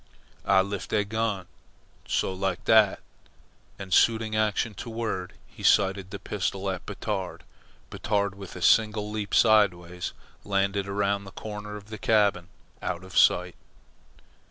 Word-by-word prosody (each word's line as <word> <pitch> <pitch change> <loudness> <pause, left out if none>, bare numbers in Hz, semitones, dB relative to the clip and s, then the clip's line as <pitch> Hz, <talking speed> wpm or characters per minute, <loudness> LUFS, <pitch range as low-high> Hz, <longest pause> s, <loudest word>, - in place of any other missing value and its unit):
"Ah 95 -1 +5
lift 100 0 -5
de 105 - +1
gun, 110 -3 -2 0.6
so, 95 - 0
like 95 0 -2
dat." 110 -3 +5 0.8
And 95 -2 -5
suiting 110 -1 +3
action 110 +1 0
to 105 - -8
word, 110 -5 -3
he - - -15
sighted 95 -1 +3
the 100 - -6
pistol 100 -1 -2
at 95 - -7
Batard. 100 -2 -4 0.5
Batard, 100 -2 -1
with 100 -2 -10
a 90 - -6
single 105 -1 +3
leap, 105 -2 -3
sideways, 90 -6 +3 0.3
landed 100 0 0
around 100 0 -1
the 95 - -10
corner 105 0 -7
of 105 +1 -14
the 110 - -6
cabin 100 -5 +2 0.3
out 90 0 -3
of 95 -1 -12
sight. 90 0 +4
100 Hz, 140 wpm, -27 LUFS, 95-105 Hz, 0.8 s, Ah